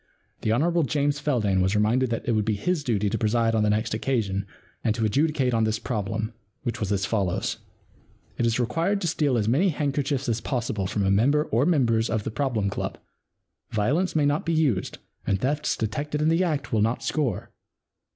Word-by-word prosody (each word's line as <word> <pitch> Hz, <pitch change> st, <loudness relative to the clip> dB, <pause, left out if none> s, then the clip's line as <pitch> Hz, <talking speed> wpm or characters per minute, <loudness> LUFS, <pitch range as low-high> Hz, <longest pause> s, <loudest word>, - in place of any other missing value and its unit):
The 110 Hz, -, 0 dB
Hon. 165 Hz, +9 st, +2 dB
James 145 Hz, 0 st, 0 dB
Feldane 110 Hz, -10 st, +1 dB
was 95 Hz, +3 st, +1 dB
reminded 115 Hz, +5 st, +2 dB
that 115 Hz, -, -3 dB
it -, -, +2 dB
would 110 Hz, -2 st, +2 dB
be 110 Hz, 0 st, 0 dB
his 170 Hz, -, -1 dB
duty 105 Hz, -6 st, 0 dB
to -, -, -1 dB
preside 115 Hz, +1 st, +2 dB
on 110 Hz, -, +2 dB
the 105 Hz, -, +2 dB
next 110 Hz, +2 st, 0 dB
occasion 105 Hz, -5 st, -1 dB, 0.4 s
and 110 Hz, -, +1 dB
to 115 Hz, -, 0 dB
adjudicate 135 Hz, +2 st, +1 dB
on 115 Hz, -1 st, +2 dB
this 110 Hz, 0 st, +1 dB
problem, 110 Hz, 0 st, -3 dB, 0.3 s
which 120 Hz, -3 st, -3 dB
was 105 Hz, -2 st, -2 dB
as 95 Hz, -2 st, +1 dB
follows: 95 Hz, -4 st, -1 dB, 0.4 s
* -, -, -33 dB
It 120 Hz, -, +2 dB
is 115 Hz, +1 st, +1 dB
required 165 Hz, -, 0 dB
to 175 Hz, -, 0 dB
steal 150 Hz, -5 st, +1 dB
as 105 Hz, -2 st, 0 dB
many 150 Hz, -, +3 dB
handkerchiefs 140 Hz, -3 st, -1 dB
as 115 Hz, -1 st, 0 dB
possible 115 Hz, -7 st, -2 dB
from 100 Hz, +1 st, -1 dB
a 95 Hz, -, +3 dB
member 140 Hz, +9 st, +3 dB
or 125 Hz, +2 st, +1 dB
members 115 Hz, -9 st, +2 dB
of 110 Hz, -1 st, -1 dB
the -, -, -4 dB
Problem 120 Hz, -6 st, -1 dB
Club. 100 Hz, -, -3 dB, 0.7 s
Violence 145 Hz, -, 0 dB
may 150 Hz, -2 st, +3 dB
not 145 Hz, +2 st, +1 dB
be 170 Hz, -, -1 dB
used 140 Hz, -, +1 dB, 0.3 s
and 95 Hz, -, +1 dB
thefts 145 Hz, +5 st, 0 dB
detected 145 Hz, +7 st, -2 dB
in 155 Hz, +1 st, +2 dB
the 165 Hz, +3 st, +3 dB
act 150 Hz, -7 st, -2 dB
will 110 Hz, -, +3 dB
not 115 Hz, +3 st, 0 dB
score. 135 Hz, -, -1 dB
120 Hz, 205 wpm, -25 LUFS, 110-145 Hz, 0.7 s, many